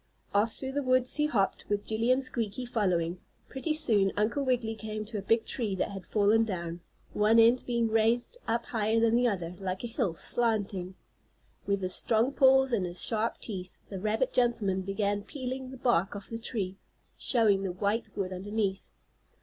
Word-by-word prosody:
Off 210 +3 +2
through 265 0 -5
the 285 +1 -1
woods 255 0 +1
he 300 0 +2
hopped, 200 -9 0
with 205 0 -1
Jillie 225 +3 +1
and 260 +1 +2
Squeaky 235 -1 -3
following. 180 -7 0 0.3
Pretty 270 +4 -3
soon 220 -11 +5
Uncle 230 +7 +1
Wiggily 245 -4 0
came 215 0 -5
to 215 -1 -5
a - - -5
big 225 +3 +1
tree 215 -6 -2
that 190 - -2
had 195 -3 -8
fallen 215 +2 +3
down, 170 -5 -4 0.3
one 215 +2 +3
end 230 +2 +5
being 235 -2 +1
raised 225 - +1
up 230 +1 0
higher 220 0 0
than 230 0 +3
the 245 +1 +3
other, 180 -6 -2
like 185 +1 -4
a - - -2
hill, 195 -6 -1
slanting. 200 -4 -1 0.7
With 200 -1 0
his 185 0 0
strong 230 +7 +1
paws 265 -1 +5
and 190 -6 +1
his 175 +1 -4
sharp 225 0 +1
teeth, 185 -4 -7
the 195 - -5
rabbit 220 +6 0
gentleman 230 -6 +1
began 200 +1 -1
peeling 260 +2 -6
the 265 - -9
bark 220 -7 +1
off 200 +2 -9
the 230 - -4
tree, 200 -5 -4 0.4
showing 215 -6 +2
the 195 -2 -2
white 200 +5 -1
wood 190 -2 -2
underneath. 200 +1 -3
220 Hz, 185 wpm, -29 LUFS, 195-240 Hz, 0.7 s, soon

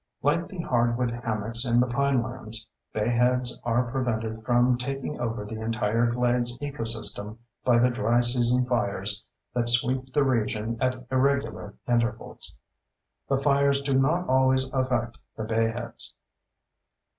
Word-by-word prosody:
Like 165 +5 +2
the 190 - -10
hardwood 120 -1 +1
hammocks 115 -1 0
in 120 -2 +3
the 125 - +4
pinelands, 125 -4 -1 0.3
bayheads 120 +3 +1
are 120 +1 0
prevented 110 -4 -2
from 120 +1 +3
taking 135 +4 -4
over 115 -3 -3
the 110 +1 -6
entire 115 +1 +1
glades 120 0 +1
ecosystem 115 -6 -3 0.3
by 120 -2 +4
the 125 +1 +4
dry 120 0 +2
season 120 +1 +2
fires 100 -4 -1 0.3
that 120 -1 +1
sweep 130 +2 +2
the 145 - +3
region 115 -3 -1
at 130 -1 -1
irregular 135 -6 0
intervals. 120 -1 -2 0.7
The 135 - +3
fires 140 0 +3
do 140 0 -1
not 155 +7 +2
always 130 0 +3
affect 125 -3 -1 0.2
the 110 - -3
bayheads. 115 +2 -2
120 Hz, 130 wpm, -26 LUFS, 115-130 Hz, 0.7 s, the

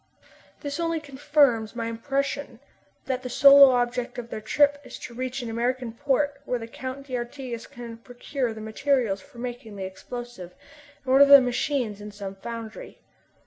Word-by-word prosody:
This 285 +2 -4
only 330 -1 0
confirms 275 -6 +1
my 230 -1 -3
impression 275 +2 -3 0.5
that 260 -1 -2
the 250 - -6
sole 275 +2 +8
object 245 0 -1
of 235 -1 -7
their 215 - -5
trip 285 +6 +2
is - - -9
to 240 - -9
reach 255 +1 -4
an 235 - -5
American 245 +1 -1
port 280 +3 0
where 250 - -1
the 225 - -7
Count 260 +4 -7
d'Artigas 245 -1 -5
can 235 -1 -9
procure 245 +1 -4
the 220 0 -8
materials 220 -2 0
for 240 - -18
making 240 -3 -6
the 195 - -5
explosive, 190 -2 -8 0.5
and 260 - -1
order 280 +1 +8
the 280 0 +10
machines 245 -4 -1
in 210 - -7
some 200 -1 -7
foundry. 225 +2 -8
245 Hz, 165 wpm, -26 LUFS, 230-275 Hz, 0.5 s, the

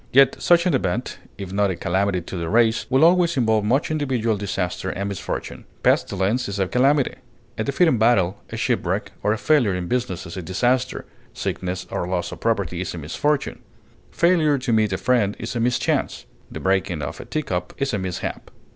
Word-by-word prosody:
Yet 135 0 +5
such 175 0 +4
an 180 - +2
event, 120 -1 -1 0.2
if 95 -2 -7
not 100 0 +2
a 95 - -1
calamity 95 +2 0
to 85 - -8
the 85 -2 -3
race, 115 0 +2
will 135 +4 +5
always 170 -2 +4
involve 110 -4 +2
much 135 +8 +1
individual 130 -7 0
disaster 95 -2 -3
and 100 +2 -3
misfortune. 100 - -5 0.2
Pestilence 100 +5 +1
is 100 - -4
a 95 -1 +1
calamity; 135 +5 +2 0.4
a 110 - -2
defeat 140 +8 +2
in 125 -8 +2
battle, 100 -6 +3
a - - -6
shipwreck, - - -1
or 105 - +1
a 110 - +1
failure 120 -8 +2
in 90 -1 -3
business 120 -8 -2
is 85 - -8
a 95 - -4
disaster; 120 +9 0 0.3
sickness 90 0 -3
or 85 - -2
loss 90 -1 -2
of - - -8
property 100 -6 -1
is 95 0 -4
a - - -6
misfortune; 135 - -1 0.5
failure 165 -4 +3
to 125 -2 -1
meet 110 -2 +2
a 95 - 0
friend 105 0 +1
is 115 - -5
a - - 0
mischance; 120 +1 0 0.2
the - - -7
breaking 95 -4 0
of - - -5
a - - -8
teacup 115 -13 -3
is 140 -2 -1
a 100 - 0
mishap. 95 -2 -4
110 Hz, 195 wpm, -22 LUFS, 95-130 Hz, 0.5 s, Yet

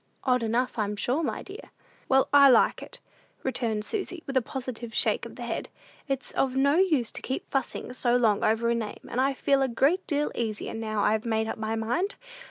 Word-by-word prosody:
"Odd 250 -2 +2
enough, 230 +2 -1
I'm 210 -1 -1
sure, 250 +9 0
my 270 -9 -3
dear." 405 +5 -11 0.4
"Well, 265 0 +4
I 280 -1 +8
like 250 - +4
it," - - -10 0.4
returned 225 -5 -1
Susy, 370 -5 -4
with 275 - -5
a 260 - +4
positive 245 -2 -6
shake - - +2
of - - -13
the - - -7
head. - - -4 0.4
"It's 270 -2 -3
of 265 -1 0
no 280 +3 +3
use 315 - +2
to - - -7
keep 260 - -4
fussing 265 -2 -2
so 245 -1 +1
long 220 -4 +2
over 225 +2 +2
a - - +3
name, 225 -3 -5
and 250 - -1
I 270 +1 +1
feel 275 0 +2
a 270 - +3
great 280 +10 +1
deal 295 -1 0
easier, 220 -3 -3
now 215 -2 -2
I've 215 0 +2
made 220 -1 0
up - - -4
my 220 0 -2
mind! 245 - -1
250 Hz, 210 wpm, -27 LUFS, 225-275 Hz, 0.4 s, I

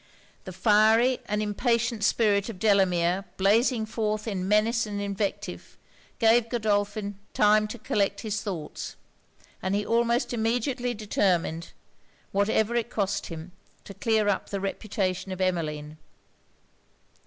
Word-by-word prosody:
The 185 - -6
fiery 220 +6 +4
and 210 +1 -1
impatient 230 +1 0
spirit 205 -1 +2
of 220 - -7
Delamere 185 -3 +2
blazing 220 +4 +3
forth 215 -1 -2
in 190 -3 -2
menace 220 +2 +2
and 205 -1 -4
invective, 200 0 -4 0.4
gave 230 0 +4
Godolphin 205 -3 -1 0.2
time 215 0 +4
to 225 - -7
collect 200 -2 -1
his 215 -1 -3
thoughts; 170 -8 -6 0.7
and 190 +1 -1
he 205 0 -1
almost 235 +2 +1
immediately 240 +2 -1
determined, 180 -6 0 0.6
whatever 210 +3 +1
it 235 -1 0
cost 200 -3 -1
him, 165 +1 -8 0.3
to 200 - -10
clear 220 +1 +1
up 205 - 0
the 200 - -3
reputation 190 -1 -2
of 185 - -5
Emmeline. 155 -4 -2
210 Hz, 125 wpm, -27 LUFS, 195-225 Hz, 0.7 s, fiery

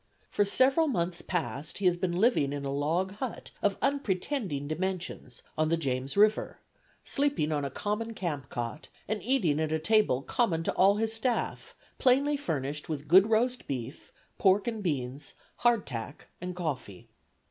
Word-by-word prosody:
For 205 - +2
several 265 +9 +4
months 175 - -1
past 155 -4 -3
he 200 - -3
has 180 -1 +5
been 175 -1 -1
living 185 - +3
in 140 -1 -4
a 135 - -2
log 165 +7 0
hut 255 0 -5
of 200 -1 +1
unpretending 205 - -1
dimensions 175 -6 -4
on 155 0 +1
the 165 - +2
James 135 0 -2
River, 210 +1 +3 0.5
sleeping 280 - 0
on 145 -2 0
a 140 - -2
common 215 - -3
camp 155 -8 -3
cot, 120 +6 -5 0.2
and 215 +1 -2
eating 210 - +1
at 155 -1 -1
a 160 - +2
table 160 - +2
common 175 - 0
to - - -1
all 195 +2 +5
his 220 +1 0
staff, 235 +2 -2 0.2
plainly 275 +3 +4
furnished 150 - -3
with 150 -1 -4
good 190 +7 +7
roast 245 +3 +1
beef, 130 0 -5 0.3
pork 195 +2 +4
and 225 -2 -2
beans, 140 -6 -3 0.2
'hard 240 -3 +3
tack' 125 +3 -7
and 180 0 -4
coffee. 130 - -5
180 Hz, 165 wpm, -29 LUFS, 145-220 Hz, 0.5 s, good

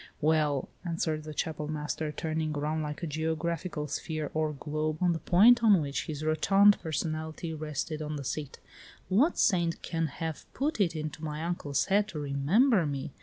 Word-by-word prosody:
"Well," 150 -3 +2 0.2
answered 165 -3 -2
the 155 - -6
Chapel 150 -1 -2
master, 150 0 -3
turning 155 0 -2
around 155 +2 -1
like 150 +2 -5
a - - +1
geographical 160 +1 -2
sphere 155 +1 -3
or 155 -1 0
globe 155 +1 -3
on 180 -2 +3
the 165 - -3
point 230 +9 +6
on 205 -5 +6
which 140 -2 -3
his 155 -1 -4
rotund 195 +6 +5
personality 160 0 -3
rested 155 0 -4
on 150 0 -3
the 140 - -5
seat, 145 +1 -4 0.5
"what 245 - +3
saint 170 -5 +2
can 165 -1 -1
have 160 +2 -6
put 280 -4 0
it 170 -4 +2
into 155 0 -5
my 155 0 -4
uncle's 160 -5 -1
head 205 +1 +2
to 160 - -6
remember 160 - +3
me? 140 0 -4
155 Hz, 170 wpm, -29 LUFS, 150-170 Hz, 0.5 s, point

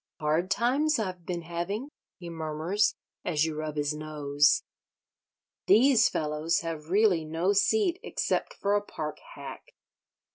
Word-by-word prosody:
"Hard 155 +4 +1
times 270 +9 +2
I've 185 -5 -4
been 175 -2 -3
having," 175 - -4 0.3
he 175 - -9
murmurs, 165 +5 0 0.3
as 155 -2 +1
you 160 - -2
rub 155 0 -4
his 145 0 0
nose. 150 -1 +2 1.0
"These 255 +2 +6
fellows 155 +4 0
have 160 -2 -5
really 195 -4 +3
no 165 +5 0
seat 365 - +2
except - - -2
for 200 0 0
a 205 - +3
park 155 -6 -6 0.2
hack. 140 -2 -10
170 Hz, 135 wpm, -28 LUFS, 155-205 Hz, 1.0 s, These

